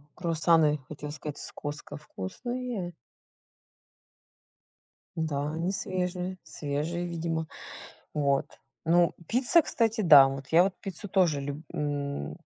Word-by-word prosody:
Круассаны, 160 -3 +3
хотела 150 -1 -6
сказать, 150 -1 -6
с - - -7
Costco 145 0 -6
вкусные. 200 - -5 2.2
Да, 150 -2 -1
они 165 +4 -1
свежие 185 -2 -2
свежие 155 +4 -3
видимо. 165 -1 -2 0.7
Вот, 140 -2 +2 0.4
ну 170 +1 +4
пицца, 255 +8 +4
кстати, 225 -5 0
да, 145 -7 +9
вот 135 0 -5
я 170 +2 +6
вот 190 0 0
пиццу 195 +1 -6
тоже 175 -7 +2
люб 145 +2 -5
м, 140 - -3
160 Hz, 110 wpm, -28 LUFS, 145-185 Hz, 2.2 s, да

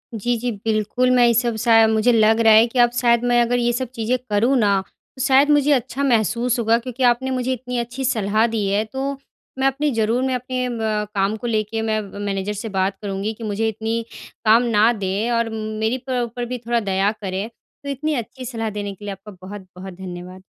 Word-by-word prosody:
जी, 240 +3 -1
जी, 245 +2 -2
बिल्कुल, 220 +3 +1
मैं 245 -1 +5
ये 235 - +4
सब 235 0 +1
शा 225 -2 +6
मुझे 220 +2 +3
लग 220 -1 +4
रहा 225 -1 +6
है 220 +1 +7
कि 245 +2 -3
अब 240 0 +5
शायद 235 -1 +3
मैं 240 0 +4
अगर 240 +1 +1
ये 240 0 +1
सब 255 0 -3
चीज़ें 235 +2 0
करूँ 220 +6 +2
ना 200 -3 +3 0.4
तो 260 - -6
शायद 270 +2 +4
मुझे 295 0 +4
अच्छा 265 +1 0
महसूस 240 0 +1
होगा 230 0 +3
क्योंकि 255 +1 -5
आपने 250 +2 +2
मुझे 255 0 -1
इतनी 250 0 -5
अच्छी 240 +3 -4
सलाह 215 0 +1
दी 225 -3 -2
है। 200 +2 +1
तो 265 +5 -3 0.5
मैं 265 - +3
अपनी 285 +2 0
ज़रूर 230 +1 0
मैं 260 -1 0
अपने 250 0 -3
म 220 -3 -1
काम 195 +2 +1
को 240 - -5
लेके 220 0 -1
मैं 220 -1 0
मैनेजर 200 0 -4
से 210 +2 -5
बात 195 0 -1
करूँगी 200 +1 -3
कि 225 - -11
मुझे 215 +1 -1
इतनी 220 +2 -2 0.4
काम 225 +3 +6
ना 220 +3 +5
दें 200 +2 -2
और 230 -1 +1
मेरी 220 +2 -2
पु 250 -1 0
ऊपर 240 +1 -5
भी 250 +1 -4
थोड़ा 235 0 +2
दया 195 -1 +1
करें। 195 +2 -3
तो 280 +4 -14
इतनी 295 +3 -2
अच्छी 255 +1 -6
सलाह 225 -2 -3
देने 205 -1 -5
के 205 - -12
लिए 205 - -4
आपका 195 +2 -10 0.2
बहुत-बहुत 190 -1 -9
धन्यवाद। 185 0 -9
225 Hz, 215 wpm, -21 LUFS, 210-245 Hz, 0.5 s, है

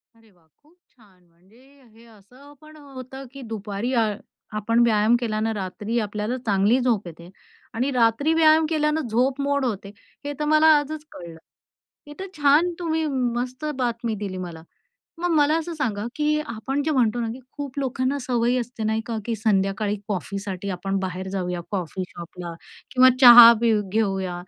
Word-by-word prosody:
अरे 225 -1 -24
वाह! 175 -3 -31 0.2
खूप 305 +4 -27
छान 195 -7 -25
म्हणजे 190 +8 -25 0.3
हे 230 +1 -19
असं 245 +7 -18
पण 310 0 -15
होतं 270 -2 -10
की 275 - -10
दुपारी 215 +2 -4
अ, 225 -3 +2 0.4
आपण 230 +3 +1
व्यायाम 220 0 +3
केल्यानं 220 -2 -1
रात्री 205 +4 -4
आपल्याला 210 +3 -3
चांगली 205 +4 +2
झोप 230 -7 0
येते. 170 +1 -11 0.4
आणि 255 +5 -1
रात्री 245 +5 +2
व्यायाम 320 0 +5
केल्यानं 305 -2 0
झोप 255 +5 0
मोड 280 -1 0
होते, 205 -4 -4 0.4
हे 290 - -3
तर 300 - -1
मला 310 +1 +4
आजच 300 +1 -4
कळलं. 170 -2 -10 0.7
हे 295 - -9
तर 385 - -5
छान 295 +5 +4
तुम्ही 320 -2 -1 0.3
मस्त 255 +4 -4
बातमी 235 -3 -2
दिली 195 -2 -5
मला. 170 -3 -7 0.6
मग 350 0 -1
मला 300 +2 +3
असं 330 +1 -5
सांगा, 225 -7 -2
की 300 0 +1
आपण 265 +5 -3
जे 315 - -1
म्हणतो 245 -5 +1
ना 230 - -2
की 255 - -10
खूप 285 -1 -7
लोकांना 265 +1 -1
सवय 245 -1 0
असते 235 -2 -6
नाही 220 +1 0
का 230 -2 -3
की 235 - -1
संध्याकाळी 205 -1 0
कॉफीसाठी 195 0 -4
आपण 195 +2 -2
बाहेर 185 0 -4
जाऊया 180 -2 -3
कॉफी 185 -2 -3
शॉपला 170 0 -9 0.4
किंवा 255 0 +6
चहा 240 -2 +11
पेऊ 225 -3 +2
घेऊया 195 -4 -1
230 Hz, 165 wpm, -23 LUFS, 200-280 Hz, 0.7 s, चहा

